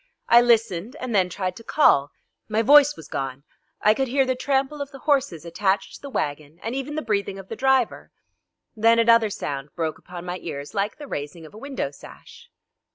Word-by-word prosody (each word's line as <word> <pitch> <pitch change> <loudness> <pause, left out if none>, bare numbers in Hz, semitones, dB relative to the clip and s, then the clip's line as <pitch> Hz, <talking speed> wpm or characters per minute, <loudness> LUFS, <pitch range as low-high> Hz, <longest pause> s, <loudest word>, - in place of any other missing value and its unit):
I 235 +1 +7
listened 230 -2 +1
and 255 -2 -4
then 185 -3 +3
tried 185 0 -3
to 230 - -11
call. 145 - +4 0.4
My 215 +1 +1
voice 290 +3 +7
was - - -11
gone. 135 0 -4 0.4
I 215 - +6
could 265 +4 -1
hear 270 +2 +2
the 260 - +1
trample 275 +2 -1
of 280 - -4
the 280 - -11
horses 270 - +1
attached 190 +3 -1
to - - -11
the 280 - -8
wagon, 150 - -4
and 225 +3 -3
even 270 +2 -4
the 310 - -2
breathing 200 -3 -1
of 195 -1 -11
the 225 - -5
driver. 265 0 +1 0.7
Then 230 +1 +4
another 230 -1 +5
sound 140 -7 -5
broke 160 -2 -3
upon 180 -1 -9
my 180 +1 -4
ears 145 -3 -7
like 200 0 -1
the 295 - -9
raising 155 - -6
of 155 - -14
a 215 - -11
window 275 +2 -4
sash. 480 0 -15
220 Hz, 205 wpm, -24 LUFS, 175-265 Hz, 0.7 s, I